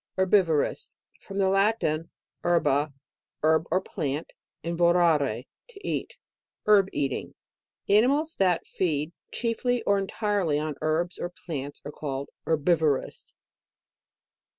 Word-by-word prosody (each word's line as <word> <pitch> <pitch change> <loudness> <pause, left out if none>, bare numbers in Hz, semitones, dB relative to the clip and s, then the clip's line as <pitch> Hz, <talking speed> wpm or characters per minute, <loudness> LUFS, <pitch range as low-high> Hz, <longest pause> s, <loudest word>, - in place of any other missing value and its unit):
HERBIVOROUS. 185 -5 +2 0.3
From 195 - -8
the 195 -1 +3
Latin, 195 -5 +1 0.3
her 175 0 +3
ba, 145 0 +1 0.5
herb 160 +1 +3
or 185 - +2
plant, 150 -5 -4 0.3
and 170 0 -2
vorare 165 -8 +3 0.3
to 405 -4 -10
e - - +1
it. - - -17 0.5
Herb 200 -2 +5
eating. 135 -3 -2 0.5
Animals 275 +10 +3
that 180 -3 +2
feed 155 -3 -1 0.2
chiefly, 240 +1 0
or 200 0 +3
entirely 195 -5 0
on 155 0 -2
herbs 160 +3 0
or 175 - -3
plants, 145 -5 -6
are 140 -2 -4 0.2
herbivorous. 155 -2 +1
170 Hz, 115 wpm, -27 LUFS, 150-195 Hz, 0.5 s, Herb